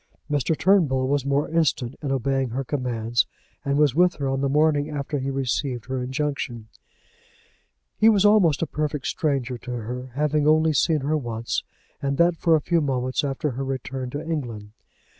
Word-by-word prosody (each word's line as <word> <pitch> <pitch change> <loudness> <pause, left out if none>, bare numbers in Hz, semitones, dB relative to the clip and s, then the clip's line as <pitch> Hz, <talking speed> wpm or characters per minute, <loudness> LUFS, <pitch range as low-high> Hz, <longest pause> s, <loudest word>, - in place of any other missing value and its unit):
Mr. 145 +2 +1
Turnbull 150 -10 +3
was 140 0 0
more 140 +1 +1
instant 150 -6 0
in 140 -3 -2
obeying 135 0 0
her 130 +4 -3
commands, 120 -4 -1 0.4
and 140 0 0
was 150 -4 +4
with 175 +4 +3
her 140 -2 -3
on 135 0 -1
the 140 - +1
morning 150 0 +2
after 145 0 -3
he 135 +1 -2
received 130 -2 -2
her 130 0 -3
injunction. 130 -4 -3 1.3
He 220 - +7
was 205 -2 +4
almost 190 -8 +4
a - - +2
perfect 150 -2 -3
stranger 135 -5 -1
to 125 - -11
her, 125 +2 -5
having 150 0 +1
only 155 +1 +4
seen 155 +1 +2
her 150 +3 0
once 115 -5 -2 0.4
and 140 0 -1
that 170 +1 +4
for 165 0 +3
a 155 - +1
few 170 +2 +1
moments 130 -2 -1
after 140 +1 -1
her 130 +3 -4
return 135 -1 -4
to 145 +5 -5
England. 120 -10 -4
140 Hz, 180 wpm, -24 LUFS, 130-155 Hz, 1.3 s, He